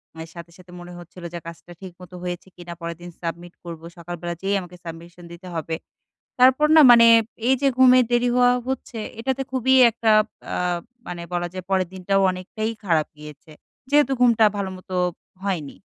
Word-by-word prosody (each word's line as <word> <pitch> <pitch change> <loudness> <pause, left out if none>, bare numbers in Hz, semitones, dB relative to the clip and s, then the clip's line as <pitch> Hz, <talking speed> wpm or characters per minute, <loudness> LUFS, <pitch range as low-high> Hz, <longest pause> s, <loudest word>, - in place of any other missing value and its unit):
অ্যা 160 - -7
সাথে, 170 0 -10
সাথে 180 -1 -17
মনে 175 0 -10
হচ্ছিল 175 +1 -13
যে 170 - -4
কাজটা 170 +1 -11
ঠিকমতো 180 -1 -12
হয়েছে 180 +1 -5
কিনা? 175 -1 -9
পরেরদিন 170 +1 -7
সাবমিট 170 +1 -6
করব, 165 -2 -8 0.2
সকালবেলা 175 0 -6
যেয়েই 200 +1 0
আমাকে 180 0 -12
submission 170 +1 -10
দিতে 180 +2 -12
হবে। 160 0 -3 0.7
তারপর 260 +4 +5
না 310 - +9
মানে 230 -1 +8 0.4
এই 265 - +5
যে 275 - +4
ঘুমের 255 -1 +6
দেরি 240 0 +2
হওয়া 245 0 +5 0.2
হচ্ছে, 260 -3 -5 0.2
এটাতে 265 +2 -2
খুবই 260 +1 +2 0.2
একটা 225 0 0 0.4
আ - - -2 0.5
মানে 175 -1 -6
বলা 175 0 -1
যায় 185 -1 -7
পরের 185 -2 +1
দিনটাও 195 +1 0
অনেকটাই 190 +4 -4
খারাপ 165 -4 +1
গিয়েছে, 150 +1 -13 0.4
যেহেতু 290 -2 +3
ঘুমটা 235 -3 +5
ভালোমত 190 -2 -6 0.5
হয়নি। 175 -8 -3
180 Hz, 165 wpm, -22 LUFS, 170-230 Hz, 0.7 s, না